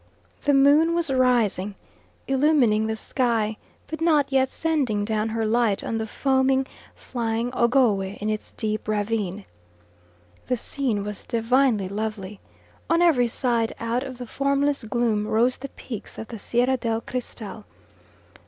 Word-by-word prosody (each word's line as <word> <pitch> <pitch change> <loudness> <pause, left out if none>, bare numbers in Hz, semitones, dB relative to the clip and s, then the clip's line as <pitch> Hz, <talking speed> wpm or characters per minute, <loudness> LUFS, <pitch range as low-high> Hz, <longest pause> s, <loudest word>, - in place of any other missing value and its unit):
The 290 - +4
moon 295 +5 +5
was 335 -4 0
rising, 235 -7 +2 0.5
illumining 265 -6 +3
the 220 - -1
sky, 225 -3 0 0.3
but 315 +1 -7
not 305 -4 +3
yet 265 -1 +3
sending 270 -11 0
down 215 0 -1
her 225 0 -1
light 220 -2 +1
on 225 - -2
the 220 - -3
foaming, 265 +2 +2 0.3
flying 235 0 -2
Ogowe 235 -4 +3 0.2
in 210 - -4
its 215 0 -3
deep 215 -1 -3
ravine. 210 -2 -1 1.0
The 250 - 0
scene 235 -4 -2
was 210 0 -6
divinely 235 -3 +2
lovely; 210 -1 -4 0.5
on 335 +1 +4
every 265 -9 +4
side 235 -1 0
out 230 +2 -1
of 260 -2 -7
the 250 - -6
formless 280 +2 0
gloom 220 -2 0
rose 235 +4 +2
the 275 +1 -6
peaks 230 -4 -8
of 220 - -7
the 230 - -7
Sierra 245 +5 +1
del 225 -1 -1
Cristal. 225 -4 -6
235 Hz, 145 wpm, -24 LUFS, 215-265 Hz, 1.0 s, moon